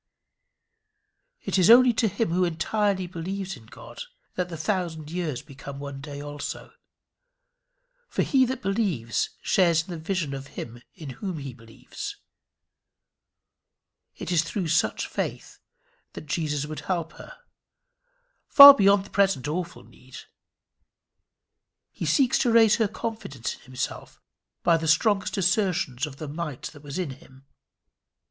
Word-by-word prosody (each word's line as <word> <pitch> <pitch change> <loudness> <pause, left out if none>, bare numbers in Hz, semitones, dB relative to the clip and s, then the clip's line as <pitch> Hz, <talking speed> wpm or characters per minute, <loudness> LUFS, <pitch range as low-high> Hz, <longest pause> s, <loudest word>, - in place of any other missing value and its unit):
It - - 0
is 180 - +4
only 245 +1 +8
to 225 0 +1
him 205 +2 -1
who 180 +2 +2
entirely 190 +3 0
believes 185 +3 -5
in 110 - -16
God - - -11 0.3
that 180 -1 -3
the 165 - -6
thousand 160 -2 -3
years 165 -7 -3
become 140 -1 -10
one 140 -1 -7
day 145 0 -8
also. 145 0 -7 1.4
For - - 0
he 265 -2 +3
that 260 +1 -4
believes 190 - -1
shares 170 -4 +3
in 180 - -11
the 170 - -5
vision 160 -3 -2
of 135 0 -7
him 120 +1 -7
in 155 -8 -8
whom 175 +7 -5
he 140 -3 -7
believes. 115 -2 -9 2.0
It - - -5
is 170 -3 +4
through 170 +1 -3
such 155 -10 +1
faith - - -5 0.5
that - - -9
Jesus 150 -1 -2
would 155 0 -6
help 170 -3 -3
her - - -12 1.1
far 280 0 +12
beyond 200 -4 +3
the - - -15
present 195 -10 +1
awful 170 +3 -4
need. - - -14 1.7
He - - -5
seeks 265 -3 +3
to 240 - +2
raise 225 -2 +5
her 225 -2 +2
confidence 220 - -5
in - - -23
himself 130 0 -6 0.4
by 170 -1 +4
the 160 0 -4
strongest 195 +6 +2
assertions 185 - 0
of 135 -2 -11
the 155 - -6
might 150 -2 -6
that 145 - -14
was 145 +1 -7
in 180 -7 -2
him. 130 +1 -16
170 Hz, 140 wpm, -25 LUFS, 145-195 Hz, 2.0 s, far